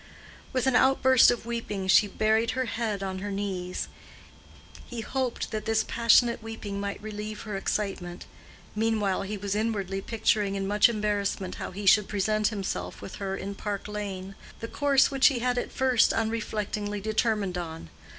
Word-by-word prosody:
With 255 Hz, -1 st, 0 dB
an 265 Hz, -1 st, +2 dB
outburst 260 Hz, -1 st, +6 dB
of 240 Hz, -1 st, -1 dB
weeping 225 Hz, -5 st, -3 dB
she 190 Hz, +3 st, +6 dB
buried 220 Hz, +4 st, +1 dB
her 260 Hz, -, +1 dB
head 220 Hz, -4 st, -2 dB
on 190 Hz, -1 st, -3 dB
her 205 Hz, +2 st, -4 dB
knees. 190 Hz, -3 st, -3 dB, 1.0 s
He 240 Hz, -2 st, -5 dB
hoped 255 Hz, +2 st, -2 dB
that 215 Hz, -1 st, -3 dB
this 220 Hz, -1 st, +1 dB
passionate 235 Hz, 0 st, +4 dB
weeping 220 Hz, -3 st, -6 dB
might 200 Hz, 0 st, -3 dB
relieve 215 Hz, 0 st, -6 dB
her 210 Hz, -2 st, -5 dB
excitement. 195 Hz, -3 st, -3 dB, 0.5 s
Meanwhile 215 Hz, -3 st, +1 dB
he 205 Hz, +2 st, -4 dB
was 200 Hz, 0 st, -3 dB
inwardly 205 Hz, -3 st, -1 dB
picturing 210 Hz, -2 st, +1 dB
in 195 Hz, 0 st, -2 dB
much 210 Hz, +4 st, +4 dB
embarrassment 205 Hz, -4 st, -1 dB
how -, -, -3 dB
he 200 Hz, +2 st, -7 dB
should 205 Hz, +1 st, +6 dB
present 215 Hz, +1 st, +1 dB
himself 200 Hz, -3 st, -4 dB
with -, -, -8 dB
her 195 Hz, -1 st, -3 dB
in 200 Hz, +1 st, -5 dB
Park 200 Hz, 0 st, -4 dB
Lane—the 200 Hz, +1 st, -7 dB
course 280 Hz, -1 st, +3 dB
which 270 Hz, -1 st, +5 dB
he 275 Hz, -, +2 dB
had 245 Hz, +1 st, 0 dB
at -, -, -5 dB
first 255 Hz, -3 st, +3 dB
unreflectingly 210 Hz, -2 st, -2 dB
determined 215 Hz, -2 st, 0 dB
on. 160 Hz, -, -7 dB
210 Hz, 160 wpm, -27 LUFS, 195-230 Hz, 1.0 s, outburst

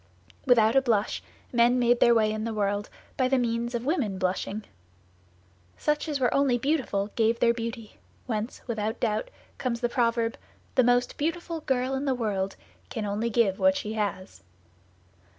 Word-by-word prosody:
Without 230 Hz, -2 st, +5 dB
a 270 Hz, -, +6 dB
blush, 220 Hz, -5 st, 0 dB, 0.3 s
men 240 Hz, +1 st, +4 dB
made 240 Hz, -1 st, +3 dB
their 235 Hz, -, +6 dB
way 215 Hz, -1 st, +3 dB
in 215 Hz, 0 st, -3 dB
the 225 Hz, -1 st, -3 dB
world 205 Hz, 0 st, -1 dB, 0.3 s
by 255 Hz, -, +3 dB
the 265 Hz, +1 st, +2 dB
means 235 Hz, 0 st, -1 dB
of 235 Hz, +1 st, -3 dB
women 265 Hz, -, 0 dB
blushing. 190 Hz, +3 st, -2 dB, 1.1 s
Such 300 Hz, +2 st, 0 dB
as 290 Hz, -2 st, -1 dB
were 245 Hz, -3 st, +2 dB
only 275 Hz, -3 st, +3 dB
beautiful 240 Hz, -7 st, -1 dB
gave 230 Hz, 0 st, +2 dB
their 235 Hz, -1 st, +4 dB
beauty, 230 Hz, -1 st, -6 dB, 0.3 s
whence, 220 Hz, -1 st, -4 dB
without 220 Hz, -1 st, -2 dB
doubt, 220 Hz, -, -1 dB, 0.3 s
comes 245 Hz, -3 st, -1 dB
the 240 Hz, -, 0 dB
proverb, 230 Hz, -1 st, +1 dB, 0.4 s
"The 255 Hz, -, +4 dB
most 245 Hz, +1 st, +2 dB
beautiful 330 Hz, +2 st, -2 dB
girl 260 Hz, -2 st, 0 dB
in 270 Hz, +1 st, -2 dB
the 265 Hz, -2 st, +1 dB
world 200 Hz, -5 st, -2 dB, 0.3 s
can 220 Hz, -2 st, -3 dB
only 210 Hz, +3 st, -1 dB
give 210 Hz, -4 st, +2 dB
what 285 Hz, 0 st, +4 dB
she 215 Hz, -6 st, -4 dB
has." 190 Hz, -, -3 dB
235 Hz, 170 wpm, -27 LUFS, 215-255 Hz, 1.1 s, a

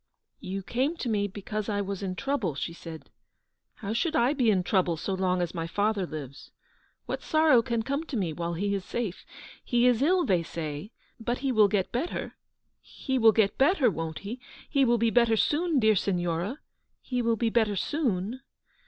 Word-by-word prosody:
" -, -, -59 dB
You 195 Hz, +1 st, -5 dB
came 265 Hz, -, -1 dB
to 255 Hz, -, -4 dB
me 205 Hz, -2 st, +1 dB
because 210 Hz, +2 st, -5 dB
I 205 Hz, -1 st, 0 dB
was 200 Hz, -1 st, -4 dB
in 185 Hz, -2 st, -3 dB
trouble/' 215 Hz, -, -1 dB
she 165 Hz, -, -3 dB
said. 165 Hz, -2 st, -10 dB, 0.3 s
" -, -, -54 dB
How 205 Hz, 0 st, -3 dB
should 315 Hz, +8 st, 0 dB
I 250 Hz, 0 st, +3 dB
be 255 Hz, -6 st, +2 dB
in 190 Hz, -4 st, +3 dB
trouble 180 Hz, -3 st, +1 dB
so 195 Hz, -, -3 dB
long 185 Hz, -1 st, +1 dB
as 175 Hz, -, -4 dB
my 165 Hz, -2 st, -3 dB
father 205 Hz, +1 st, 0 dB
lives? 140 Hz, -4 st, -8 dB, 0.6 s
What -, -, -4 dB
sorrow 310 Hz, -6 st, +4 dB
can 230 Hz, -1 st, -1 dB
come 280 Hz, +5 st, -2 dB
to 275 Hz, -, -4 dB
me 175 Hz, -6 st, -1 dB
while 170 Hz, +1 st, -3 dB
he 200 Hz, +4 st, -1 dB
is 195 Hz, -2 st, -2 dB
safe? 215 Hz, -5 st, -4 dB, 0.4 s
He 240 Hz, 0 st, +2 dB
is 250 Hz, -1 st, +4 dB
ill, 350 Hz, +4 st, +3 dB
they 180 Hz, -3 st, +2 dB
say, 160 Hz, +3 st, -6 dB, 0.3 s
but 240 Hz, +2 st, -2 dB
he 270 Hz, -, +2 dB
will 215 Hz, -4 st, +5 dB
get 200 Hz, -2 st, 0 dB
better; 260 Hz, +9 st, -3 dB, 0.4 s
he 265 Hz, -1 st, -3 dB
will 225 Hz, -1 st, +7 dB
get 205 Hz, -2 st, +1 dB
better, 270 Hz, -, +4 dB
won't 165 Hz, -1 st, -4 dB
he? 235 Hz, +5 st, -5 dB, 0.3 s
He 275 Hz, -2 st, +2 dB
will 240 Hz, -1 st, +3 dB
be 230 Hz, 0 st, +2 dB
better 235 Hz, -2 st, +4 dB
soon, 320 Hz, +6 st, +1 dB
dear 220 Hz, -2 st, +4 dB
Signora; 180 Hz, -, -1 dB, 0.4 s
he 250 Hz, -1 st, -2 dB
will 230 Hz, -1 st, +2 dB
be 225 Hz, 0 st, 0 dB
better 220 Hz, -3 st, +2 dB
soon 235 Hz, -, -1 dB
215 Hz, 200 wpm, -28 LUFS, 185-245 Hz, 0.6 s, will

